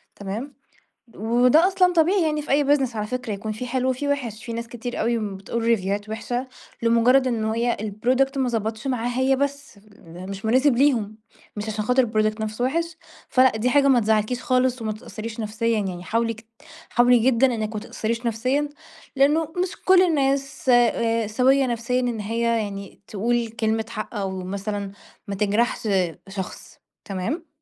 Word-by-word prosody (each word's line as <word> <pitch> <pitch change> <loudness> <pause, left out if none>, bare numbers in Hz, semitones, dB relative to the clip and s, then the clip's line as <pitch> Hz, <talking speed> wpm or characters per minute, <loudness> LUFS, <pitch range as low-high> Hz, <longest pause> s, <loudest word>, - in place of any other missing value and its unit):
تمام. 215 +8 -6 0.6
وده 245 - +4
أصلًا 365 -2 +3
طبيعي 350 +3 +3
يعني 305 -2 0
في - - -10
أي 285 +1 +4
business 255 -5 -3
على 210 - -2
فكرة 250 -1 -4
يكون 210 +2 -4
في 225 +4 -5
حلوة 255 +1 0
وفي 260 +3 -2
وِحش، 245 -7 -2
في 235 - -5
ناس 230 0 -5
كتير 240 +1 -5
أوي 235 0 +1 0.2
بتقول 215 +4 -4
ريفيوهات 205 -2 0
وِحشة 240 +4 -3 0.4
لمجرّد 235 +3 +4
إن 230 -3 0
هي 230 +2 0
الproduct 250 +6 0
ما 260 -2 +1
ضبَطش 220 0 -3
معاها، 245 -1 -1
هي 265 +1 +3
بس 280 -4 -3 0.3
مش 185 +5 -8
مناسب 255 +4 +3
ليهم، 235 -6 +2 0.4
مش 210 +1 -4
عشان 215 0 -2
خاطر 250 +3 +3
الproduct 215 0 0
نفْسه 215 +2 -2
وِحش، 335 +5 -1 0.3
فلأ، 255 -3 +4
دي 235 +3 +1
حاجة 280 +1 +4
ما 255 -3 +5
تزّعلكيش 220 +3 +1
خالص 255 -1 +1
وما 215 -1 -2
تتأثّريش 220 +1 -7
نفسيًا 220 +1 0
يعني 180 -3 -4
حاولي 230 +3 0
ك 225 +1 -15 0.4
حاولي 245 0 +5
جدًا 250 +2 +4
إنِك 220 -1 -3
ما 215 - -3
تتأثّريش 230 +2 -3
نفسيًا 255 +6 0 0.5
لأنه 295 +4 +4 0.2
مش 370 +1 -3
كلّ 375 -1 +6
الناس 275 -6 0
س - - +4 0.7
سويّة 265 +1 +4
نفسيًا، 240 +1 -1
إن 240 -3 -2
هي 225 +3 -3 0.2
يعني 200 -2 -7
تقول 235 +3 0
كلمة 220 0 -1
حق 215 0 -6
أو 195 -3 -3
مثلًا 200 +1 -4 0.4
ما 200 - -2
تجرَحش 215 +3 0 0.4
شخص، 190 -1 -7 0.3
تمام؟ 230 - -4
235 Hz, 165 wpm, -23 LUFS, 215-260 Hz, 0.7 s, كلّ